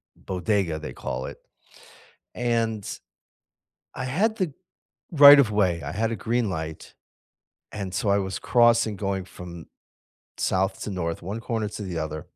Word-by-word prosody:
bodega, 95 -3 -1
they 75 - -7
call 65 +1 -4
it. - - -9 1.0
And 115 -3 0 1.1
I 130 - -4
had 220 +2 +4
the 180 -7 -1 0.7
right 145 0 +12
of 110 - -5
way, 100 -4 +2
I - - -5
had 110 +2 0
a - - -1
green 120 -2 +1
light, 80 -2 -5 0.9
and 100 -2 -4
so - - -3
I 100 - +4
was 95 -1 -3
crossing 115 -3 +4
going 95 -2 -2
from 90 -1 -10 0.9
south 95 +1 +1
to - - -4
north, 85 -3 -3
one 100 +6 -5
corner 110 -3 -1
to - - -6
the 90 -4 -4
other 75 0 -6
100 Hz, 150 wpm, -25 LUFS, 90-115 Hz, 1.1 s, right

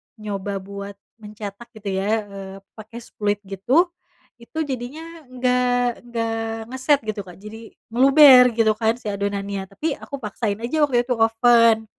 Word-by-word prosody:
nyoba 200 -2 -5
buat 200 +1 -8 0.2
mencetak 210 +1 -9
gitu 210 -2 -6
ya, 195 - -2 0.2
eee, 195 -1 -8 0.2
pake 220 +2 -10
spuit 205 -2 -2
gitu. 245 - +1 0.5
Itu 315 +7 -4
jadinya 260 +2 -5 0.3
nggak 250 -1 0
nggak 230 -1 -2 0.4
ngeset 260 +3 +2
gitu, 215 -1 -3
Kak. 180 -3 -13
Jadi 220 +3 -12 0.2
meluber 265 0 +8
gitu 220 -1 +4
kan 225 +1 0
si 245 - -22
adonannya, 200 -1 -3
tapi 295 +10 -3
aku 280 - -8
paksain 210 -3 -3
aja 310 +6 -1
waktu 250 -5 +2
itu 250 - 0
oven 225 0 +4
225 Hz, 145 wpm, -22 LUFS, 200-250 Hz, 0.5 s, meluber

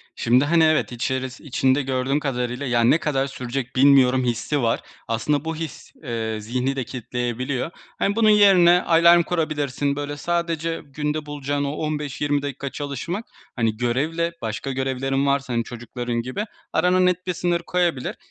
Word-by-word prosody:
Şimdi, 125 +4 +3
hani, 165 +1 +4
evet 155 -3 +2
içerisi 130 +2 -3
içinde 135 -1 +1
gördüğüm 135 +1 0
kadarıyla, 125 -1 -2
yani, 120 -1 +3
ne 160 - +5
kadar 140 -4 0
sürecek 125 -1 -5
bilmiyorum 130 -1 +5
hissi 125 +4 -1
var. 115 -1 +1 0.3
Aslında 140 +7 0
bu 160 - -2
his, 160 -2 -7
eee, 115 -4 -3
zihni 125 +5 -1
de 130 - -2
kilitleyebiliyor. 125 +4 -3 0.3
Hani, 200 - +1
bunun 220 -1 +4
yerine 185 -4 +6
alarm 170 +1 +6
kurabilirsin, 145 -4 -1
böyle, 145 0 -4
sadece 165 0 -2
günde 150 +2 -3
bulacağın 145 -1 -2
o 140 - -1
15-20 150 -2 -2
dakika 140 0 -4
çalışmak, 145 - -4 0.3
hani, 115 -3 0
görevle 155 +8 0
başka 115 +4 -3
görevlerin 135 +1 -1
varsa, 140 -2 0
hani, 115 0 +1
çocukların 120 0 -4
gibi 130 - -4 0.3
arana 180 +3 +3
net 180 0 +1
bir 180 - 0
sınır 175 0 0
koyabilir. 170 -6 -1
140 Hz, 155 wpm, -23 LUFS, 125-160 Hz, 0.3 s, yerine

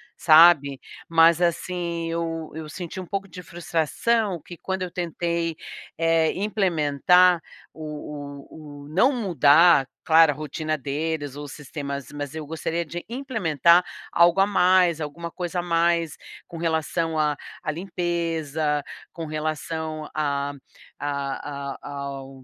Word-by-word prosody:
sabe. 155 -4 +6 0.3
Mas 165 0 +5
assim, 170 -1 -1
eu 165 -1 -3
eu 160 -1 -6
senti 175 +3 -7
um 185 - -6
pouco 195 +2 -4
de 180 0 -10
frustração 175 +4 -1
que 175 - -10
quando 190 +1 -4
eu 180 - -4
tentei, 170 -1 -2 0.4
eh, 165 -1 +3
implementar 180 -3 +3 0.3
o 150 -2 -8
o 145 -2 -11
o, - - -12
não 195 - +4
mudar, 165 - +5 0.2
claro, 160 -1 +6
a - - -6
rotina 155 +1 -3
deles, 145 0 -3
os 145 -1 -7
sistemas, 140 -2 -6
mas 145 -1 -5
eu 155 -1 -5
gostaria 165 +2 -3
de 175 +3 -6
implementar 180 - +3 0.3
algo 170 +2 +4
a 195 - +5
mais, 180 -4 +3
alguma 165 +3 -5
coisa 180 0 -3
a - - 0
mais 170 -1 +1 0.3
com 170 - -9
relação 165 0 -1
à 150 -1 +2 0.3
à - - -1
limpeza, 165 -4 -2 0.3
com 165 -2 -6
relação 155 0 -4
a 145 -2 -1 0.5
a 140 0 -4
a - - -8
ao 135 -1 -7
160 Hz, 135 wpm, -24 LUFS, 150-175 Hz, 0.5 s, sabe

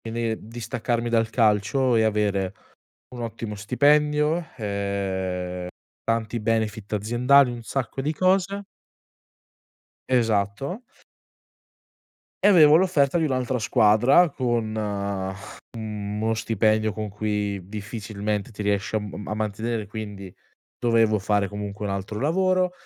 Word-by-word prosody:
quindi 115 0 -2
distaccarmi 115 +1 -2
dal 115 -1 +2
calcio 115 +3 +2
e 110 - +4
avere 100 -3 0 0.6
un 120 - -5
ottimo 115 -2 -5
stipendio, 150 +8 +2
ehm, 95 -4 -3 0.4
tanti 115 0 -1
benefit 110 -1 -1
aziendali, 125 +6 +4
un 120 -1 -7
sacco 135 +1 -3
di 150 +4 -1
cose 195 +3 +1 1.4
Esatto. 120 - 0 1.6
E - - +7
avevo 155 -6 +7
l'offerta 170 -3 +3
di 160 - +1
un'altra 130 -3 -1
squadra, 110 +10 +5
con 120 -5 -1 1.0
uno 105 0 -3
stipendio 110 -1 +1
con 105 0 -5
cui 105 -1 -2
difficilmente 105 -1 -4
ti 105 -2 -6
riesci 100 +1 0
a - - +2
m 105 0 -7
a 105 - -2
mantenere, 110 +1 -2
quindi 105 -3 -8 0.4
dovevo 115 -3 +3
fare 100 0 +1
comunque 105 0 -6
un 100 - -2
altro 100 +2 -4
lavoro, 185 +4 +2
110 Hz, 115 wpm, -24 LUFS, 105-125 Hz, 1.6 s, E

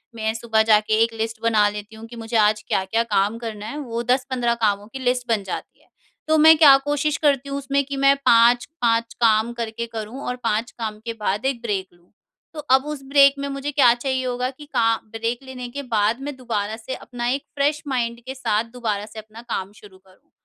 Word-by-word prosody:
मैं 220 -1 -1
सुबह 225 -1 +1
जाके 215 -1 +3
एक 230 0 -1
लिस्ट 225 0 -4
बना 215 -2 +4
लेती 210 +1 -8
हूँ 220 +1 -10
कि 240 - -11
मुझे 225 0 -2
आज 210 0 +3
क्या-क्या 195 +5 0
काम 210 -1 0
करना 220 -3 -6
है 280 - -6
वो 235 -4 -4
10-15 250 -1 0
कामों 205 0 0
की 270 - -5
लिस्ट 250 -1 -1
बन 220 -3 +1
जाती 190 - -7
है। - - -29 0.4
तो 315 0 +3
मैं 320 +1 +8
क्या 290 -4 +8
कोशिश 290 0 0
करती 280 -2 +1
हूँ 275 - -3
उसमें 280 0 0
कि 280 0 -5
मैं 275 0 +5
5-5 235 0 +3
काम 225 0 +3
करके 235 -1 -4
करूँ 225 +4 -6
और 250 - -2
5 225 +1 -1
काम 215 -2 -4
के 230 - -3
बाद 210 +3 -1
1 265 -3 -1
ब्रेक 200 -5 -2
लूँ। 175 0 -28 0.4
तो 310 - -7 0.2
अब 265 +1 0
उस 300 -2 -5
ब्रेक 275 -1 +6
में 280 - -3
मुझे 275 +1 -4
क्या 260 -5 +5
चाहिए 260 +1 -2
होगा 250 0 -1
कि 275 +3 -12
का 230 0 +3 0.2
ब्रेक 230 +3 -3
लेने 255 -2 -7
के 280 +3 -6
बाद 215 +4 +1
मैं 290 0 -5
दोबारा 220 -4 -3
से 245 +4 -6
अपना 240 -1 -5
एक 275 +2 -1
फ्रेश 290 +1 +1
माइंड 235 -3 -2
के 265 - -5
साथ 225 -5 0
दोबारा 215 -5 -3
से 220 +1 -10
अपना 220 +1 -12
काम 205 -5 -4
शुरू 200 -3 -15
करूँ। 190 0 -26
235 Hz, 215 wpm, -22 LUFS, 220-265 Hz, 0.4 s, मैं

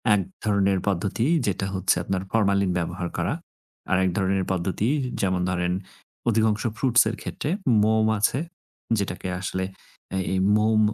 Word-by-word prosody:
এক 100 - +1 0.2
ধরনের 100 -2 +2
পদ্ধতি 100 +4 0 0.2
যেটা 95 0 0
হচ্ছে 95 0 +2
আপনার, 95 +1 -1
ফরমালিন 100 -3 +2
ব্যবহার 85 +1 -2
করা। - - 0 0.6
আরেক 95 0 +3
ধরনের 95 -1 +1
পদ্ধতি 95 +4 -1 0.3
যেমন 95 -2 +1
ধরেন, 90 0 0 0.6
অধিকাংশ 110 -1 +2
ফ্রুটস 125 +2 +5
এর 110 - -3
ক্ষেত্রে, 145 - -4 0.3
মোম 110 0 +3
আছে 110 +5 +2 0.6
যেটাকে 95 -2 -3
আসলে 95 -1 -2 0.7
এই 95 - +1 0.2
মোম 110 0 +3
100 Hz, 130 wpm, -25 LUFS, 95-110 Hz, 0.7 s, ফ্রুটস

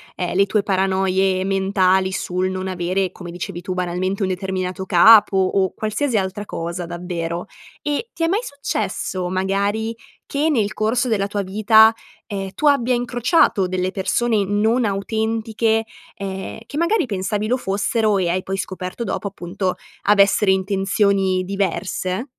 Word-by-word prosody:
ehm, 180 -1 -3
le 195 +1 +4
tue 210 +1 +1
paranoie 190 -1 +1
mentali 190 -1 +2
sul 185 -1 -1
non 185 0 -4
avere 185 +1 -1
come 175 -2 -9
dicevi 175 0 -6
tu, 185 +1 -4
banalmente, 180 +2 -2
un - - +1
determinato 185 0 -3
capo 205 +2 +6
o 190 0 +1
qualsiasi 220 +3 -1
altra 195 +1 -2
cosa 170 -1 -4
davvero! 170 0 -4 0.4
Eh, 295 +11 -2
ti 330 - -3
è - - +3
mai 395 +6 +1
successo 200 - -3
magari, 200 +4 -1 0.3
che 290 +2 0
nel 220 -9 +1
corso 235 +4 +1
della 210 -4 +1
tua 205 0 -2
vita, 215 +3 +5 0.4
ehm, 195 -2 -4
tu 300 - 0
abbia 255 -4 +3
incrociato 245 - +2
delle 185 0 -1
persone 210 +3 +1
non 220 +5 +1
autentiche, 220 +2 0 0.3
ehm, 195 0 -6
che 285 - -6
magari 340 +3 +2
pensavi 205 +1 -2
lo 250 +3 +1
fossero 210 0 0
e 180 -2 0
hai 185 +2 -1
poi 195 0 -3
scoperto 185 +3 -5
dopo 200 -1 -3
appunto 185 0 -3 0.3
avessero 200 -1 +4
intenzioni 195 0 +1
diverse? 190 +1 -2
195 Hz, 145 wpm, -21 LUFS, 185-220 Hz, 0.4 s, capo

